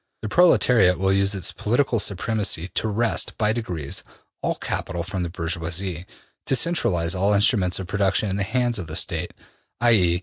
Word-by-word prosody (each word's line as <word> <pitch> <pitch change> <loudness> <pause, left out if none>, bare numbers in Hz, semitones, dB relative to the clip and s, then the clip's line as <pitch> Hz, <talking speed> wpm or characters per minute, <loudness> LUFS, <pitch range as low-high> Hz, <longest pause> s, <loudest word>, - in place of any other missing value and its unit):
The 110 - -3
proletariat 115 - +4
will 95 +1 +1
use 100 +1 +1
its 95 -4 -3
political 120 +1 0
supremacy 100 -3 -1
to 110 - -2
wrest, 110 +2 -1
by 110 -1 +2
degrees, 90 -12 -4 0.4
all - - -1
capital 85 -2 -3
from 95 +1 -4
the 85 - -2
bourgeoisie, 85 +1 -3 0.4
to 135 - +2
centralize 115 - +1
all 100 +2 +2
instruments 100 -3 +2
of 95 - -5
production 95 +1 +1
in 95 - -2
the 100 - -2
hands 120 +2 0
of 90 - -6
the 80 - -6
State, - - -1 0.5
i.e. 95 -8 +3
100 Hz, 170 wpm, -23 LUFS, 90-110 Hz, 0.5 s, proletariat